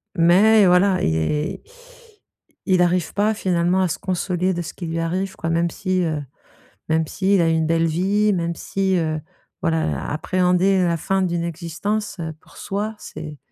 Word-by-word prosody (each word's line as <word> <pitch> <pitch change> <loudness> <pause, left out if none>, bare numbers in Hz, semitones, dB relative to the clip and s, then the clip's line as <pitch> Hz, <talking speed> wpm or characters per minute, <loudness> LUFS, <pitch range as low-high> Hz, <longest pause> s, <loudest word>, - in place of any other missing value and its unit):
mais 195 +5 +5
voilà 185 +1 +4
et - - +2
et 150 - -1
i 485 - -10
il 180 - +3
arrive 175 -2 +1
pas 210 +2 +2
finalement 180 -1 +1
à 185 - +2
se 160 - -3
consoler 185 0 -1
de 175 - -3
ce - - -7
qui 175 - -7
lui 165 +1 -2
arrive, 185 +4 -2
quoi. 165 - -3
Même 170 +1 +1
si, 185 -2 -1
heu, 155 -3 -1 0.7
même 160 0 +1
s'il 195 +3 +1
a 165 - +3
eu - - +2
une 160 0 +1
belle 165 0 +2
vie, 200 +6 +1
même 170 -2 -1
si, 190 +1 -1
heu, 155 -2 -1 0.4
voilà, 165 -3 +1
heu, - - -2 0.2
appréhender 185 +3 +2
la 170 -1 +1
fin 195 +4 0
d'une 170 -2 -1
existence, 175 +5 -3
heu, 160 -1 -4
pour - - -19
soi, 210 +2 -3
c'est 150 -1 -8
180 Hz, 185 wpm, -21 LUFS, 165-195 Hz, 0.7 s, mais